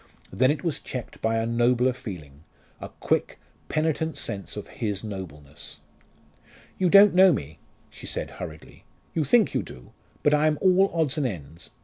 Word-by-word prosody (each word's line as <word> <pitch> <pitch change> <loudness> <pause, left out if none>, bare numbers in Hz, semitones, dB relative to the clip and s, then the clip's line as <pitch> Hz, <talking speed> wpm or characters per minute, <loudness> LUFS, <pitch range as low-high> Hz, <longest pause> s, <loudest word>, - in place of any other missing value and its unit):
Then 130 +1 +3
it 145 -1 -1
was 165 -4 -1
checked 125 -3 -7
by 115 0 +1
a 115 - 0
nobler 120 +2 +2
feeling 85 - -9 0.4
a - - -7
quick, - - -1 0.3
penitent 160 0 -1
sense 100 +1 -5
of 105 - -6
his 105 -3 -4
nobleness. 90 -9 -8 1.0
"You 185 -2 +3
don't 200 +2 +8
know 185 +1 +7
me," 75 - -4 0.3
she - - -10
said - - -3
hurriedly: 80 -3 -9 0.3
"you 160 - +1
think 215 - +3
you - - +1
do. 60 -1 -12 0.3
But 145 - +4
I 150 +1 +4
am 155 -1 +1
all 190 +1 +4
odds 160 -3 0
and 140 - +1
ends. 80 - -8
125 Hz, 165 wpm, -25 LUFS, 95-160 Hz, 1.0 s, don't